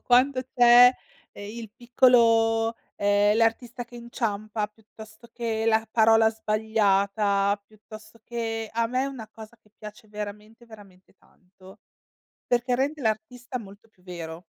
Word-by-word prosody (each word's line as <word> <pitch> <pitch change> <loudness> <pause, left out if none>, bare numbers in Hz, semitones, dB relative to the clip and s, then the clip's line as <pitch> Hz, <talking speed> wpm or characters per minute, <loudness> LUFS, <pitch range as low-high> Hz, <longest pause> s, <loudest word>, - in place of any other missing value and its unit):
quando 255 +2 +3 0.2
c'è, 245 0 +7 0.4
ehm, 205 0 -9
il 225 -3 -9
piccolo 230 -2 +3 0.2
ehm, 205 +1 +2
l'artista 235 +2 -1
che 240 0 -14
inciampa, 215 -3 -4
piuttosto 220 +1 -16
che 225 -2 -3
la 220 0 +2
parola 225 0 +4
sbagliata, 205 -2 0
piuttosto 215 +1 -15
che 225 -2 -4
a 230 0 0
me 255 +3 -1
è - - -1
una 255 -6 -8
cosa 220 +1 -13
che 210 - -29
piace 215 +1 -12
veramente, 210 +2 -9
veramente 195 -5 -17
tanto, 185 +1 -20 0.7
perché 245 +1 0
rende 280 +3 -2
l'artista 245 +3 -3
molto 205 +1 -14
più 185 -4 -31
vero. 170 -2 -8
220 Hz, 130 wpm, -25 LUFS, 210-235 Hz, 0.7 s, c'è